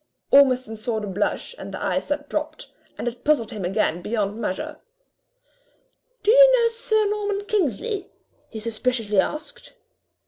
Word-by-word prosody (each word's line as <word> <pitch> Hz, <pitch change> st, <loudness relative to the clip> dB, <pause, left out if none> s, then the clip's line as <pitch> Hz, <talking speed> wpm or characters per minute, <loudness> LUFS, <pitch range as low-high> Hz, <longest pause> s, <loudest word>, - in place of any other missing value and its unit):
Ormiston 255 Hz, -5 st, +4 dB
saw 220 Hz, +1 st, -2 dB
the 210 Hz, -, -5 dB
blush 200 Hz, -, -2 dB
and -, -, -7 dB
the -, -, -6 dB
eyes -, -, -1 dB
that 290 Hz, 0 st, -2 dB
dropped, 305 Hz, +1 st, -4 dB, 0.3 s
and -, -, -4 dB
it 240 Hz, 0 st, -5 dB
puzzled 280 Hz, -7 st, +2 dB
him 210 Hz, -4 st, -5 dB
again 180 Hz, -2 st, 0 dB
beyond 205 Hz, 0 st, -2 dB
measure. 190 Hz, -4 st, -4 dB, 1.5 s
"Do 420 Hz, -, +5 dB
you -, -, +8 dB
know 465 Hz, 0 st, +3 dB
Sir 435 Hz, -2 st, +1 dB
Norman 410 Hz, -1 st, -2 dB
Kingsley?" 400 Hz, -, -1 dB, 0.4 s
he 220 Hz, -, -7 dB
suspiciously 225 Hz, -2 st, 0 dB
asked. 310 Hz, -, -3 dB
255 Hz, 145 wpm, -23 LUFS, -, 1.5 s, you